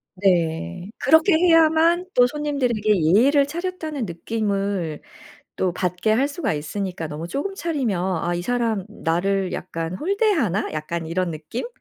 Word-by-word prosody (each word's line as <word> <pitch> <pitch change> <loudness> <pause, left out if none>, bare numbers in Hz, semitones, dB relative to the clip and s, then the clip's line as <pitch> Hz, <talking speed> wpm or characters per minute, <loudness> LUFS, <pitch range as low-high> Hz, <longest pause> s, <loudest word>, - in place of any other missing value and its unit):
네. 175 - 0
그렇게 320 +7 +4
해야만 330 +1 +4
또 245 - +6
'손님들에게 250 - 0
예의를 265 - +4
차렸다.'는 320 -5 -4
느낌을 195 -3 -2 0.6
또 185 -2 0
받게 180 +4 0
할 270 +6 +2
수가 285 - -2
있으니까. 165 +2 -4
너무 150 +3 -6
쪼금 290 - -3
차리면 275 - -1 0.3
'아 175 - 0
이 175 - -3
사람 230 -3 0
나를 185 +3 -1
약간 165 +1 -4
홀대하나?' 330 - 0
약간 160 +2 -4
이런 175 +1 -1
느낌? 155 - -5
205 Hz, 295 characters per minute, -22 LUFS, -, 0.6 s, 또